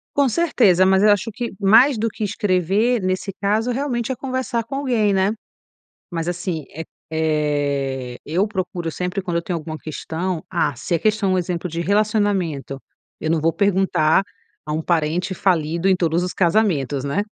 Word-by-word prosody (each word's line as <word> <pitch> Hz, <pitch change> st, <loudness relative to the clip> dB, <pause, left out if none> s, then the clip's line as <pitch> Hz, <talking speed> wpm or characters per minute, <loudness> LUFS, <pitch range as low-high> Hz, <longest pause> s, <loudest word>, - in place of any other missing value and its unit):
Com 280 Hz, -1 st, +4 dB
certeza. 225 Hz, -, +3 dB
Mas 190 Hz, +1 st, +4 dB
eu 215 Hz, -, +6 dB
acho 205 Hz, +2 st, +1 dB
que, 235 Hz, +2 st, -4 dB
mais 225 Hz, +6 st, +5 dB
do 225 Hz, +1 st, 0 dB
que 215 Hz, -, -6 dB
escrever, 205 Hz, +4 st, +1 dB
nesse 185 Hz, +1 st, -2 dB
caso, 215 Hz, +4 st, +1 dB
realmente 250 Hz, -2 st, -2 dB
é -, -, -1 dB
conversar 255 Hz, -2 st, -2 dB
com 270 Hz, +5 st, -7 dB
alguém, 240 Hz, -7 st, +1 dB
né. 195 Hz, +2 st, +2 dB, 0.8 s
Mas, 165 Hz, -1 st, -3 dB
assim, 175 Hz, -2 st, -3 dB
eh 160 Hz, +2 st, -5 dB, 0.3 s
eh, 145 Hz, -5 st, -1 dB
eu 180 Hz, +7 st, +1 dB
procuro 180 Hz, -4 st, -3 dB
sempre, 180 Hz, +4 st, -3 dB
quando 175 Hz, -2 st, -2 dB
eu -, -, 0 dB
tenho 170 Hz, 0 st, -3 dB
alguma 155 Hz, 0 st, -6 dB
questão, 160 Hz, +3 st, -4 dB
ah, 170 Hz, -6 st, 0 dB
se 145 Hz, -, -4 dB
a 165 Hz, -, +2 dB
questão 215 Hz, -3 st, +1 dB
é -, -, +3 dB
um -, -, +2 dB
exemplo 180 Hz, 0 st, -2 dB
de 165 Hz, -, -4 dB
relacionamento, 195 Hz, -8 st, 0 dB, 0.4 s
eu 155 Hz, -, -1 dB
não 165 Hz, -, +2 dB
vou 165 Hz, +2 st, +1 dB
perguntar 190 Hz, -4 st, +2 dB, 0.4 s
a 150 Hz, -, -3 dB
um 160 Hz, -, -1 dB
parente 170 Hz, +3 st, 0 dB
falido 170 Hz, -1 st, +1 dB
em 190 Hz, -, +5 dB
todos 170 Hz, -1 st, +1 dB
os 180 Hz, -, -3 dB
casamentos, 165 Hz, -, +1 dB
né. 145 Hz, +9 st, -1 dB
185 Hz, 180 wpm, -21 LUFS, 160-210 Hz, 0.8 s, eu